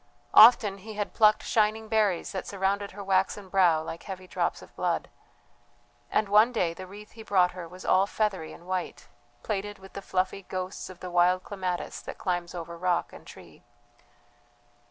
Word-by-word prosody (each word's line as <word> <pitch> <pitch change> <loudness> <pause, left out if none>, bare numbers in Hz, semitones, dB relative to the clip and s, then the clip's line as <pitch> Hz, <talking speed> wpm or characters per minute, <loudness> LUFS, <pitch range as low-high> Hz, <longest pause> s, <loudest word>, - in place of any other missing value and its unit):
Often 215 -3 +7
he 215 +3 -9
had 205 -1 -3
plucked 215 -1 +4
shining 220 0 +1
berries 215 -5 +1
that 190 -2 -5
surrounded 200 +1 -1
her 200 +1 -9
waxen 195 +1 0
brow 175 -5 +3
like 165 +1 -7
heavy 185 -2 -8
drops - - -2
of - - -17
blood. - - -1 1.0
And 215 - +1
one 210 +4 +5
day 180 -8 0
the 185 +2 -9
wreath 210 +3 -12
he 225 - -12
brought 185 -4 +3
her 180 -2 -8
was 180 +2 -12
all 190 +2 +4
feathery 200 -7 -2
and 170 - -13
white, 185 -1 -4 0.4
plaited 205 -1 -3
with 190 0 -15
the 200 - -6
fluffy 190 +1 -1
ghosts 185 0 -5
of 185 -1 -12
the 180 - -6
wild 180 +1 +3
clematis 185 -3 -4
that - - -8
climbs 175 -2 -3
over 170 0 -6
rock 175 0 -1
and - - -13
tree. - - -14
190 Hz, 175 wpm, -27 LUFS, 180-205 Hz, 1.0 s, Often